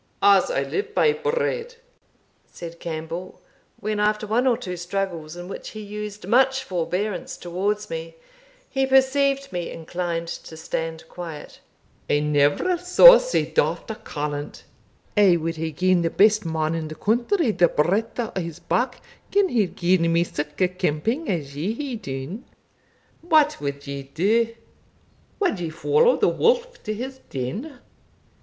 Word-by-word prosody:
"As 405 +4 +6
I - - 0
live 420 +1 -4
by 455 - +4
bread," 470 +1 -2 0.7
said 170 0 -9
Campbell, 165 +2 -6 0.4
when, 215 0 -2
after 210 +1 +1
one 235 +5 +1
or 240 -3 +3
two 180 -1 -5
struggles 175 -3 -4
in 175 0 -8
which 195 - -7
he 215 - -9
used 210 -1 -7
much 265 +4 +3
forbearance 180 +1 -3
towards 200 +4 -2
me, 165 0 -6 0.5
he 270 -1 0
perceived 275 +1 +2
me 175 -1 -3
inclined 170 0 -4
to 160 -1 -8
stand 160 0 -4
quiet, 165 -4 -8 0.5
"I 145 - +3
never 150 - +2
saw 365 +8 +9
sae - - 0
daft 480 - 0
a - - -4
callant! 150 -9 -5 0.5
I 200 -5 +5
wad 165 0 -3
hae 160 0 -2
gien 180 +3 +2
the 165 - +1
best 215 +2 +4
man 160 0 0
in 165 -1 -3
the 155 - -7
country 240 - +1
the 175 -4 +4
breadth 195 +11 0
o' 230 -2 -2
his 165 -2 -6
back 250 0 -1 0.3
gin 400 -1 +3
he 240 -7 +2
had 190 - -2
gien 175 -1 +2
me 170 +1 +3
sic 150 -3 -5
a 185 - +5
kemping 185 - -1
as 145 -7 -3
ye 170 +9 -1
hae 275 -1 -4
dune. 140 - -6 0.8
What 310 -3 +3
wad 140 0 -4
ye 140 -1 -5
do? 210 +12 +1 0.8
Wad 360 - +1
ye 170 -2 -3
follow 455 - +3
the - - +3
wolf - - +1
to 215 - -1
his 260 +4 -6
den? 215 - -5
195 Hz, 155 wpm, -23 LUFS, 165-260 Hz, 0.8 s, saw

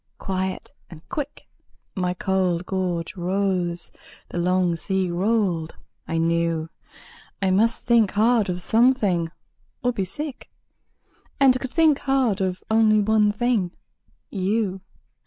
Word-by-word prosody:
Quiet 190 0 -3 0.2
and 165 -2 -13
quick 295 -4 -5 0.5
My 180 -2 -1
cold 185 -2 0
gorge 180 -3 -2
rose; 180 -1 -1 0.4
the 175 - -4
long 180 0 +2
sea 190 +1 -1
rolled; 180 -3 0 0.3
I 165 - -2
knew 165 -1 0 0.7
I 195 -1 +1
must 225 +5 +2
think 235 -4 +4
hard 220 -1 +3
of 180 0 -3
something, 220 -8 +2 0.5
or 245 0 +1
be 195 - -1
sick; 280 - -6 0.9
And 260 -2 +5
could 260 - -4
think 310 -1 +3
hard 260 -7 +1
of 185 -1 -2
only 220 -1 +5
one 210 0 +3
thing 210 -5 0 0.6
YOU! 195 0 -1
190 Hz, 120 wpm, -23 LUFS, 180-225 Hz, 0.9 s, And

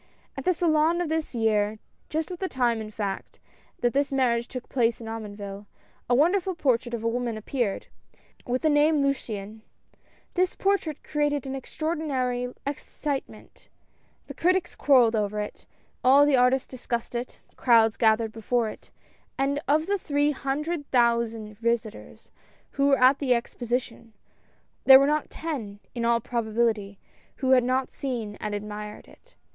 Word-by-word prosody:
At - - -6
the 365 - +4
Salon 325 0 +2
of 350 -3 -1
this 320 -4 -2
year, 215 -2 +1 0.3
just 315 +3 -2
at 355 - -6
the 380 - -2
time 240 -3 +1
in 215 - -6
fact, 205 -2 -5 0.4
that 240 -1 +2
this 280 +1 +1
marriage 240 -3 +1
took 255 -1 -7
place 235 -3 +1
at 230 - -9
Omonville, 205 -2 -7 0.4
a 245 - +4
wonder 340 +9 +4
ful 375 0 -4
portrait 245 -6 +1
of 225 - -6
a - - +1
woman 235 -1 -1
appeared, 220 -2 -2 0.6
with 250 +4 -1
thq 310 - +4
name 295 0 +4
Luciane. 220 -6 -3 0.7
This 365 0 +1
portrait 390 -7 0
created 295 -2 -1
an 265 - -4
extraordinary 265 -4 -2
ex 280 0 -4
citement. 285 -3 -6 0.6
The - - -8
critics 365 +1 +1
quarreled 245 -5 +4
over 210 -1 -1
it, 210 - -6 0.4
all 275 +3 +7
the 290 -2 +4
artists 250 +1 +3
discussed 240 -2 -4
it, 240 +1 -5 0.2
crowds 225 -3 +4
gathered 220 -1 +2
before 225 +1 -1
it, - - -12 0.5
and 280 +1 0
of 305 +2 +3
the 400 +2 0
three 290 -2 +1
hundred 290 +3 -3
thousand 235 -3 +1
visitors, 235 -2 -3 0.4
who 275 0 +1
were 275 -1 +5
at 255 +2 +5
the 255 -4 +2
Exposition, 240 -1 -4 0.7
there 265 -1 +10
were 275 - +4
not 300 +1 0
ten, 240 -11 -5
in 235 -1 -2
all 235 0 +3
probability, 220 -3 -1 0.4
who 260 -2 0
had 255 -2 +6
not 255 +1 0
seen 235 -7 -4
and 210 -1 -4
admired 210 0 -7
it. - - -21
250 Hz, 160 wpm, -26 LUFS, 225-290 Hz, 0.7 s, there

